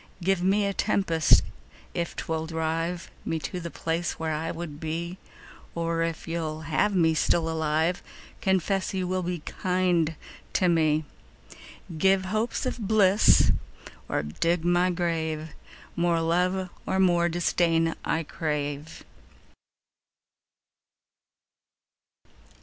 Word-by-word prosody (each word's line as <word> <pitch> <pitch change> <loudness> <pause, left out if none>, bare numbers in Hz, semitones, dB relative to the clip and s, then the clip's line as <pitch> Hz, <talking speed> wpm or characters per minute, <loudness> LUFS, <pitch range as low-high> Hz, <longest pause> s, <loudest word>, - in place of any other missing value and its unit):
Give 190 0 +2
me 200 +3 +2
a 200 - 0
tempest 190 -6 +3 0.5
if 170 0 -3
'twill 160 0 -3
drive 165 +2 -2
Me 165 - -1
to 160 +4 -4
the 170 -1 -5
place 165 +1 -2
where 160 -1 -3
I 160 +2 -2
would 160 -4 -6
be; 170 +3 -4 0.6
Or 165 0 -1
if 165 0 -3
you'll 160 -2 -3
have 165 +7 +1
me 165 -3 +4
still 160 +1 +2
alive, 160 +2 0 0.4
Confess 190 +1 +1
you 185 -1 -1
will 185 0 0
be 175 -2 -3
kind 180 -2 0 0.4
to 185 - +3
me. 155 -2 +2 0.8
10 165 - -7
Give 190 +1 +3
hopes 215 +7 -1
of 255 - -2
bliss 205 -1 +5 0.6
or - - 0
dig 165 - -1
my 175 +1 +3
grave: 160 -3 -2 0.5
More 170 -1 +2
love 180 +3 0 0.2
or 190 - +1
more 175 -2 +4
disdain 165 -1 +2
I 165 - 0
crave. 150 -1 -4
170 Hz, 120 wpm, -27 LUFS, 160-185 Hz, 0.8 s, bliss